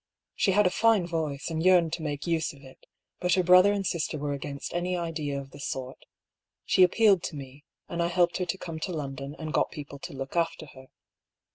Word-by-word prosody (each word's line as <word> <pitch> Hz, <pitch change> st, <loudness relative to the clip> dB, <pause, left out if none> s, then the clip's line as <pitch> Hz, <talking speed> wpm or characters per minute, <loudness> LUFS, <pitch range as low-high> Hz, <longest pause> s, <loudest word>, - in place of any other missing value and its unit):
She 195 Hz, -, +2 dB
had 210 Hz, +1 st, +4 dB
a 180 Hz, -, +3 dB
fine 225 Hz, -5 st, +3 dB
voice, 160 Hz, -3 st, -3 dB
and 160 Hz, 0 st, -2 dB
yearned 175 Hz, -2 st, +4 dB
to 170 Hz, -, -3 dB
make 145 Hz, -2 st, -4 dB
use 165 Hz, -2 st, 0 dB
of 140 Hz, -1 st, -17 dB
it; 130 Hz, -1 st, -16 dB, 0.3 s
but 180 Hz, -1 st, +1 dB
her 185 Hz, -, +2 dB
brother 180 Hz, +3 st, +7 dB
and 200 Hz, -1 st, -1 dB
sister 165 Hz, -3 st, -1 dB
were 145 Hz, 0 st, -2 dB
against 140 Hz, 0 st, -6 dB
any 180 Hz, +1 st, -1 dB
idea 155 Hz, -5 st, -3 dB
of 135 Hz, -1 st, -10 dB
the 145 Hz, -, -12 dB
sort. 130 Hz, -2 st, -6 dB, 0.6 s
She 185 Hz, -, +5 dB
ap 180 Hz, -, +4 dB
pealed 205 Hz, -5 st, +5 dB
to 160 Hz, -, -5 dB
me, 140 Hz, +1 st, -10 dB, 0.2 s
and 170 Hz, 0 st, -3 dB
I 170 Hz, -, +2 dB
helped 175 Hz, 0 st, +2 dB
her 185 Hz, -, -1 dB
to 175 Hz, -, -2 dB
come 165 Hz, -3 st, -6 dB
to 180 Hz, -, -3 dB
London, 140 Hz, -2 st, -5 dB
and 155 Hz, -2 st, -5 dB
got -, -, +2 dB
people 140 Hz, -1 st, -9 dB
to -, -, -8 dB
look 135 Hz, +2 st, -6 dB
after 165 Hz, -2 st, 0 dB
her. 130 Hz, 0 st, -14 dB
165 Hz, 230 wpm, -28 LUFS, 140-180 Hz, 0.6 s, brother